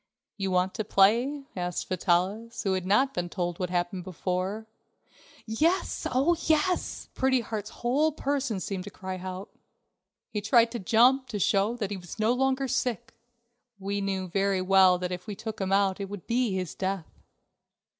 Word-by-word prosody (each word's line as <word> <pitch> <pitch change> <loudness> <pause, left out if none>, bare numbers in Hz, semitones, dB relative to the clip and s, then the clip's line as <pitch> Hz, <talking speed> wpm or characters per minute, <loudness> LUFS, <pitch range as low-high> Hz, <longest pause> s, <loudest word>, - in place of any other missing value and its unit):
"You 195 -2 -2
want 185 0 +1
to 220 - -2
play?" 235 +9 +3
asked 180 -1 -3
Vitalis, 190 +6 0
who 195 - +1
had 185 -1 -2
not 260 +8 +3
been 175 -7 -2
told 175 -2 -3
what 180 -2 -2
happened 180 +1 -1
before. 185 +3 -3 0.8
"Yes, 310 +12 0
oh, 275 +7 +3
yes!" 320 +3 +1
Pretty 260 -1 +2
Heart's 215 -2 -5
whole 280 +8 +1
person 280 -7 -1
seemed 190 -1 -4
to - - -6
cry 185 -1 -6
out. 185 +2 -6 0.8
He 210 - -2
tried 230 +2 +4
to 240 - -4
jump 250 +6 +4
to 230 -4 -4
show 200 +4 +2
that 210 -4 -3
he 200 - -2
was 175 +1 -9
no 220 +2 +2
longer 265 +1 +1
sick. 250 -5 -2 0.6
We 200 +1 -3
know 195 -1 -1
very 195 +1 0
well 185 -1 +5
that 180 0 -3
if 180 0 -6
we 210 - -4
took 220 0 -6
him 190 0 -1
out 195 -1 +2
it 195 -1 -4
would 205 -3 -8
be 240 -1 +1
his 185 -3 -3
death. 190 -3 -4
200 Hz, 175 wpm, -28 LUFS, 185-240 Hz, 0.8 s, well